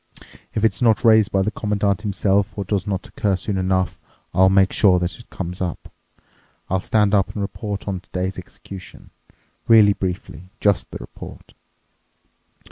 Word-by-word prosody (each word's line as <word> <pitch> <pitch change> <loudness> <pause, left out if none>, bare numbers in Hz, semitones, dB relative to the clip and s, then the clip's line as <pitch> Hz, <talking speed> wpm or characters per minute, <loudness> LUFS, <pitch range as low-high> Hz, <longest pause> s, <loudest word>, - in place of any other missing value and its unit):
If 110 - +2
it's 110 - 0
not 115 -2 +3
raised 110 -2 +5
by 95 -1 +2
the 105 - -1
Commandant 105 -3 -1
himself 100 -1 0
or 100 - -3
does 100 -1 -1
not 95 -2 -3
occur 100 -2 0
soon 95 +3 -3
enough, 95 -1 0 0.3
I'll 95 0 +5
make 95 0 +3
sure 95 -4 +4
that 90 +4 -3
it 120 - -16
comes 90 0 -6
up. 90 -3 -5 0.8
I'll 95 - +2
stand 105 +2 +1
up 100 -2 +2
and 105 - -4
report 100 0 -5
on 95 -2 -2
today's 95 0 -4
execution. 90 +1 -12 0.6
Really 110 -3 +7
briefly—just 95 +2 -2
the - - -6
report. - - -11
100 Hz, 155 wpm, -21 LUFS, 95-105 Hz, 0.8 s, Really